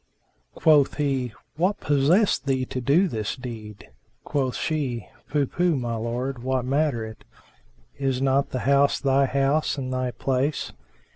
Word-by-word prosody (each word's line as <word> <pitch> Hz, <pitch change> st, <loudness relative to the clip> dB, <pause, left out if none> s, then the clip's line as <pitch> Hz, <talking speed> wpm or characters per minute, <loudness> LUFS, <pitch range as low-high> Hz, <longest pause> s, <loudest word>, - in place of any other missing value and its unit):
Quoth 150 Hz, -3 st, +4 dB
he, 135 Hz, -4 st, 0 dB, 0.3 s
"What 185 Hz, +5 st, +1 dB
possessed 145 Hz, -, +2 dB
thee 130 Hz, -1 st, +1 dB
to 130 Hz, -, -4 dB
do 150 Hz, +10 st, +3 dB
this 110 Hz, -, -3 dB
deed?" 110 Hz, -5 st, -9 dB, 0.3 s
Quoth 135 Hz, -4 st, -1 dB
she, 130 Hz, -, -2 dB, 0.2 s
"Pooh, 145 Hz, -1 st, +1 dB
pooh, 175 Hz, +4 st, +1 dB
my 120 Hz, -3 st, -2 dB
lord! 120 Hz, +3 st, -3 dB
what 130 Hz, 0 st, -1 dB
matter 135 Hz, -4 st, +1 dB
it? 110 Hz, 0 st, -10 dB, 0.8 s
Is 135 Hz, -2 st, 0 dB
not 135 Hz, +1 st, +2 dB
the 130 Hz, -, -3 dB
house 140 Hz, +1 st, +3 dB
thy 135 Hz, 0 st, +3 dB
house 140 Hz, +4 st, +1 dB
and 130 Hz, -1 st, -3 dB
thy 130 Hz, 0 st, -1 dB
place?" 135 Hz, +3 st, -1 dB
135 Hz, 145 wpm, -25 LUFS, 125-145 Hz, 0.8 s, Quoth